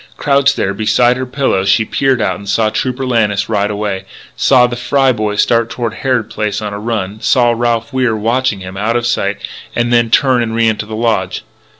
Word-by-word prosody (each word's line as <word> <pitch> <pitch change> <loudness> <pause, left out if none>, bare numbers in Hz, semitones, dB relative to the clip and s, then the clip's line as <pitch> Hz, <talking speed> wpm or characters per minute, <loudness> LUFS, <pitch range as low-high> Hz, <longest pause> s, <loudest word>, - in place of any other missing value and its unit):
Crouched 140 -1 +2
there 95 - -1
beside 110 +4 +2
her 130 0 -4
pillow 130 -7 0
she 100 +3 +2
peered 130 0 0
out 95 -3 0
and 100 -1 -9
saw 110 +1 +1
Trooper 130 +4 -2
Lannis 105 -5 +1
ride 105 -2 0
away; 100 -2 -3 0.3
saw 125 -2 +4
the 120 0 -3
Fry 135 +2 +2
boy 105 -3 -2
start 115 +2 +2
toward 115 -2 -3
Harrod 125 -2 -1
Place 105 -1 -3
on 105 -1 -5
a 100 - -5
run; 105 -2 -3
saw 120 -2 +3
Ralph 120 +2 -1
Wier 125 -4 +1
watch 120 +5 +1
them 95 -3 -7
out 110 +4 -1
of 120 - -2
sight 100 -4 0 0.4
and 120 0 0
then 120 -1 +3
turn 130 0 +3
and 115 -1 -2
re 115 0 +2
enter 110 -1 -1
the 110 - -6
lodge. 110 -5 -1
115 Hz, 210 wpm, -15 LUFS, 105-125 Hz, 0.4 s, saw